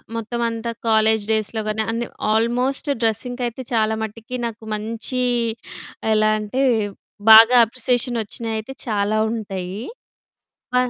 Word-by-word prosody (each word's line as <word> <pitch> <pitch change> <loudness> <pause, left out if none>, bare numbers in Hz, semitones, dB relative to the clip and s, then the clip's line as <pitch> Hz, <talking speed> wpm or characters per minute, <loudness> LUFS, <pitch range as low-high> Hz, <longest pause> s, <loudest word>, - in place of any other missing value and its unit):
మొత్తం 230 +1 -3
అంతా 230 0 -4 0.2
కాలేజి 220 -1 +3
డేస్‌లో 220 0 0
గాని, 215 +1 -1
అన్ని 230 +1 -2 0.2
ఆల్మోస్ట్ 245 +6 0
డ్రెస్సింగ్‌‌కి 245 +3 -1
అయితే 240 +2 -7
చాలా 220 -1 +2
మటికి 225 +3 -7
నాకు 230 -1 -6
మంచి 230 +4 -3 0.9
ఎలా 215 0 +3
అంటే, 215 +5 -2 0.7
బాగా 225 +3 +9
అప్రిసియేషనొచ్చినయి 235 -2 -2
అయితే 220 +5 -6
చాలా 210 0 0
ఉంటాయి. 195 -5 -5 1.0
ప - - 0
225 Hz, 115 wpm, -21 LUFS, 215-235 Hz, 1.0 s, బాగా